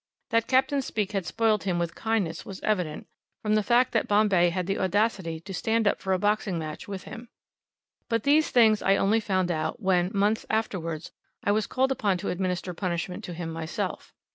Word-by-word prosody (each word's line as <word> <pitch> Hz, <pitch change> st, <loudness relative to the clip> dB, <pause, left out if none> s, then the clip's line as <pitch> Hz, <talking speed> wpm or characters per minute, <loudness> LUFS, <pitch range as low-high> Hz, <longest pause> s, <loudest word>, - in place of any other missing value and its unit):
That 230 Hz, 0 st, +2 dB
Capt. 265 Hz, +2 st, +3 dB
Speke 210 Hz, -5 st, -2 dB
had 195 Hz, -4 st, -2 dB
spoiled 220 Hz, -3 st, +1 dB
him 180 Hz, -3 st, 0 dB
with 170 Hz, -1 st, -1 dB
kindness 215 Hz, -7 st, -1 dB
was 195 Hz, -1 st, -8 dB
evident, 180 Hz, -8 st, -1 dB, 0.4 s
from 215 Hz, -1 st, +1 dB
the 215 Hz, -, +4 dB
fact 245 Hz, +4 st, +3 dB
that 225 Hz, -, +1 dB
Bombay 205 Hz, -4 st, +4 dB
had 180 Hz, +1 st, -2 dB
the 195 Hz, +2 st, -1 dB
audacity 190 Hz, -4 st, 0 dB
to 195 Hz, +3 st, -8 dB
stand 220 Hz, +4 st, +1 dB
up -, -, +2 dB
for 190 Hz, -, -2 dB
a 190 Hz, -, +3 dB
boxing 205 Hz, -1 st, 0 dB
match 155 Hz, -2 st, -6 dB
with 195 Hz, -2 st, -6 dB
him. 230 Hz, +1 st, -10 dB, 0.8 s
But 230 Hz, -2 st, 0 dB
these 300 Hz, +2 st, +4 dB
things 220 Hz, -3 st, +5 dB
I 195 Hz, -, +4 dB
only 205 Hz, +3 st, +3 dB
found 185 Hz, -4 st, 0 dB
out, 155 Hz, +5 st, -2 dB
when, 185 Hz, -3 st, +2 dB
months 210 Hz, +2 st, +1 dB
afterwards, 170 Hz, -8 st, -2 dB, 0.3 s
I 205 Hz, -, +2 dB
was 215 Hz, +1 st, +1 dB
called 265 Hz, +1 st, +1 dB
upon 205 Hz, -7 st, +1 dB
to -, -, -4 dB
administer 180 Hz, 0 st, -2 dB
punishment 180 Hz, 0 st, -3 dB
to 175 Hz, -, -6 dB
him 165 Hz, -1 st, -5 dB
myself. 165 Hz, 0 st, -4 dB
195 Hz, 195 wpm, -27 LUFS, 180-220 Hz, 0.8 s, things